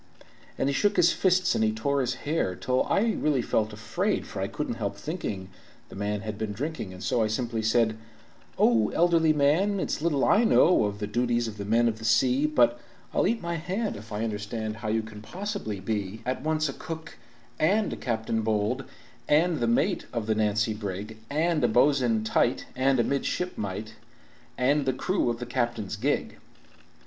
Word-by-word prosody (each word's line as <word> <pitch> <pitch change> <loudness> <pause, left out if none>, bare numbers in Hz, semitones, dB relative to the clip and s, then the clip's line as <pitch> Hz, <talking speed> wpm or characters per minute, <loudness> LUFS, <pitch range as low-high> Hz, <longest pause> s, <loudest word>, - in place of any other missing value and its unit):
And - - 0
he 140 - +1
shook 205 +7 +2
his 175 -1 +6
fists 185 -1 +2
and - - +1
he 110 - +3
tore 140 +6 0
his 125 0 -1
hair, 145 - -1
Till 130 +7 0
I 225 +3 +2
really 145 -5 +1
felt 110 -1 0
afraid, 105 +1 -1
For - - -6
I - - 0
couldn't - - -4
help - - -2
thinking 95 -2 -5 0.4
the - - -11
man 100 +1 -2
had 105 -1 -6
been 110 -2 -2
drinking, 140 -5 -4
And 90 0 -9
so 120 - +1
I 110 - +2
simply 115 +1 -2
said: 110 0 +2 0.6
"O, 115 -3 +4
elderly 165 -2 +4
man, 155 +8 +2
it's - - -2
little 150 -4 +1
I 215 - +4
know 180 - +5
Of 100 0 -3
the 105 - -3
duties 120 +2 0
of 105 -1 -8
men 115 +2 +3
of 110 -1 -1
the - - -10
sea, 130 +6 +3
But 120 -5 +3 0.3
I'll - - +2
eat 230 -4 -1
my 170 0 -2
hand 190 +7 -2
if 110 +2 -11
I 105 +1 -2
understand 110 0 -3
How 110 -1 -6
you 110 +1 +1
can 110 -1 -10
possibly 185 - -5
be 105 +1 -3
"At 130 +1 -2
once 155 +1 0
a 135 - -4
cook, 160 +3 -8 0.4
and 200 +7 +2
a - - -3
captain 110 -2 -2
bold, 110 +4 0 0.4
And 160 +2 +3
the 120 - +1
mate 115 - +1
of 115 -3 -3
the 110 - +1
Nancy 110 0 +1
brig, 105 +1 -6
And 155 0 +1
a - - +5
bo'sun 120 -2 +3
tight, 120 +2 +1
and 130 0 +2
a - - +4
midshipmite, 110 - -2 0.6
And 140 +2 +2
the 130 - +2
crew 180 +1 0
of 120 - -1
the 125 - -5
captain's 120 -4 -2
gig." 135 +8 -1
120 Hz, 195 wpm, -27 LUFS, 110-150 Hz, 0.6 s, his